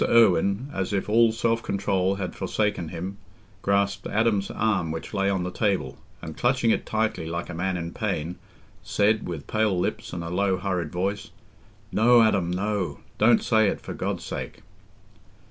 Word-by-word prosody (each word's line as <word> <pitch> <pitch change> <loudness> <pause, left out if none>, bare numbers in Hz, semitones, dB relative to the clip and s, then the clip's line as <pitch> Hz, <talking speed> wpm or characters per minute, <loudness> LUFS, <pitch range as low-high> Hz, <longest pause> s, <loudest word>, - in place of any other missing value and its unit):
Irwine, 100 +1 +4
as 95 +1 -2
if 100 - -1
all 115 +2 +5
self 115 0 0
control 95 -2 0
had 95 -3 -4
forsaken 105 -5 -1
him, 90 +4 -6 0.4
grasped 100 0 +1
Adam's 105 -3 +1
arm, 100 -7 0
which 80 +6 -5
lay 100 -1 +1
on 95 -2 0
the 90 - -3
table, 100 0 -1 0.2
and, 80 - -6
clutching 120 +1 +2
it - - -1
tightly 110 -7 -1
like 85 +1 -4
a - - -6
man 90 +2 -1
in 85 -1 -4
pain, 80 +4 -2 0.4
said, 105 +1 +1
with 80 -5 -5
pale 110 -3 +1
lips - - -2
and 85 -1 -4
a 85 - -5
low 95 +1 +1
hurried 90 -4 -2
voice, 95 +3 -2 0.6
"No, 120 +2 +6
Adam, 100 -6 +2
no—don't 100 +3 +1
say 110 -2 +4
it, - - -1
for - - -7
God's - - -3
sake!" - - -6
100 Hz, 165 wpm, -25 LUFS, 90-110 Hz, 0.6 s, No